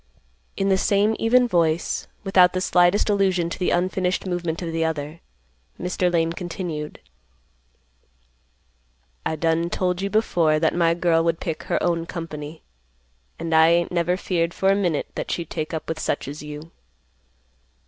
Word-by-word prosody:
In 195 0 +1
the 190 -1 +3
same 205 +3 +2
even 245 +2 +4
voice, 170 -5 0 0.2
without 185 -2 +5
the 185 - 0
slightest 180 +1 +3
allusion 190 -4 +1
to - - -5
the 180 - +1
unfinished 185 +1 0
movement 175 -2 -3
of 165 - -3
the 165 0 0
other, 155 0 -3 0.6
Mr. 180 0 0
Lane 165 -1 +1
continued, 170 -4 -5 2.3
"I 160 - -1
done 165 +2 0
told 180 0 -1
you 200 - -1
before 175 -7 +2
that 160 0 +2
my 170 -1 +2
girl 170 -1 +2
would 165 0 0
pick 165 -4 -4
her - - 0
own 170 -1 0
company, 155 -2 -7 0.7
and 165 - -3
I 160 0 +6
ain't 170 +1 +2
never 175 +1 +1
feared 175 -3 -1
for 190 - +2
a - - +3
minute 175 -7 0
that - - -5
she'd 170 -3 -3
take 155 -2 -3
up 160 - -5
with 160 -1 -3
such 145 - -2
as 145 +2 -7
you. 150 +2 -9
170 Hz, 160 wpm, -23 LUFS, 160-185 Hz, 2.3 s, I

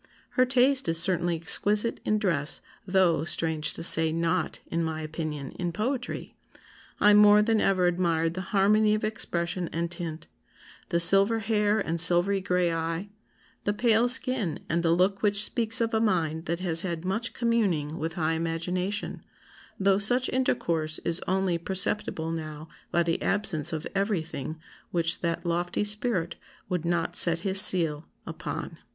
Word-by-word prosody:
Her 255 -1 +1
taste 260 0 +2
is 165 0 +2
certainly 175 -1 +2
exquisite 205 +7 +2
in 215 - 0
dress 170 -7 -1 0.3
though 185 -4 +1
(strange 160 -2 -1
to - - -6
say) 160 -2 +6
not, 165 +2 -2
in 170 0 -3
my 160 -1 -4
opinion, 155 -3 -6
in 175 -1 -2
poetry. 245 +7 -5 0.6
I 210 - +5
more 210 0 +6
than 225 0 +1
ever 185 -2 +1
admired 170 -2 0
the 185 - -5
harmony 210 +2 +2
of 215 - -5
expression 175 -4 -3
and 170 +1 -3
tint, 165 -3 -5 0.6
the 170 - 0
silver 195 +6 +6
hair 215 -1 0
and 170 -4 +1
silvery 180 +3 +5
gray 180 -2 0
eye, 165 +4 -4 0.5
the 205 - -1
pale 235 +1 +2
skin, 255 -8 +2
and 170 +1 -1
the 170 - 0
look 185 +4 +1
which 205 -1 +1
speaks 230 0 0
of 230 -1 -1
a 220 - +1
mind 165 -7 -1
that 170 +2 -3
has 170 -3 +3
had 170 -2 -5
much 220 +5 -2
communing 190 -11 -1
with 160 +1 -4
high 160 -2 -1
imagination, 180 +5 -4 0.6
though 195 0 +2
such 245 +5 +3
intercourse 165 -11 0
is 170 +1 +2
only 185 -2 -1
perceptible 185 -3 -2
now 155 -1 -7 0.2
by 170 - +1
the 165 0 -2
absence 195 -8 -1
of 160 -1 -5
everything 165 - -3 0.3
which 170 -1 -2
that 170 0 -3
lofty 175 +3 -2
spirit 210 -5 -3 0.3
would 180 -2 -3
not 170 0 -2
set 170 -1 +4
his 190 +1 +5
seal 165 -6 +4 0.2
upon." - - -7
180 Hz, 160 wpm, -26 LUFS, 165-210 Hz, 0.6 s, say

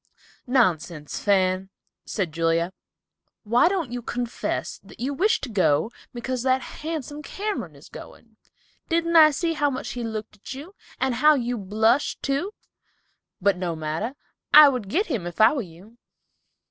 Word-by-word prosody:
"Nonsense, 175 - 0
Fan," 190 -1 +2 0.4
said 185 -7 -2
Julia. 165 +2 0 0.7
"Why 235 +7 +4
don't 350 -9 -1
you 245 0 -4
confess 240 0 -3
that - - -16
you 270 +4 -2
wish 390 +10 +2
to - - -4
go 185 -2 +2 0.2
because 250 +1 -3
that 260 0 +1 0.2
handsome 300 -2 -5
Cameron 410 +7 -4
is - - -15
going? - - -13 0.5
Didn't 335 0 +1
I 315 -2 +9
see 330 +3 -1
how 295 -2 +1
much 260 -2 -4
he 245 - -5
looked 220 -1 -5
at 210 - -8
you, 305 +8 -10 0.3
and 265 -1 +1
how 300 +6 +5
you 245 -2 -1
blushed, 220 +6 +1
too? 280 +8 -1 0.9
But 195 0 +2
no 175 -2 -2
matter. 160 - -3 0.4
I 300 -1 +10
would 250 -7 -3
get 380 - +1
him, 230 - -3
if 175 - -8
I 220 +4 +7
were 285 - -1
you!" 195 +5 -14
240 Hz, 160 wpm, -24 LUFS, 190-290 Hz, 0.9 s, I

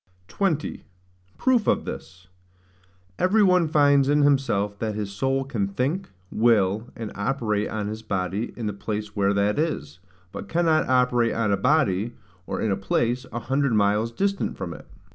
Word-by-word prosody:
20. 170 -7 -1 0.5
Proof 250 -5 +2
of - - +2
this. 90 0 -8 0.9
Every 205 +4 +4
one 180 -3 +4
finds 145 -3 +4
in 145 0 +4
himself 115 -8 +1
that 110 -2 -2
his 105 -2 -4
soul 135 +6 0
can 115 -8 -2
think, 135 - -2 0.2
will, 110 -1 +2
and 115 -3 -6
operate 105 -1 -1
on 105 -2 -3
his 110 +1 -5
body 100 +1 -2
in 115 - -4
the 105 - -2
place 105 +1 -5
where 100 0 +2
that 100 +5 +1
is, 90 - -2 0.3
but - - -8
cannot 165 -3 +2
operate 125 -2 +2
on 115 -3 +1
a - - +4
body, 110 -2 +1 0.3
or - - -3
in 110 - 0
a - - +2
place, 120 +6 -1
an 120 - -4
hundred 135 +1 +1
miles 105 +2 +2
distant 200 +9 -1
from - - -5
it. - - -12
115 Hz, 165 wpm, -24 LUFS, 100-145 Hz, 0.9 s, Every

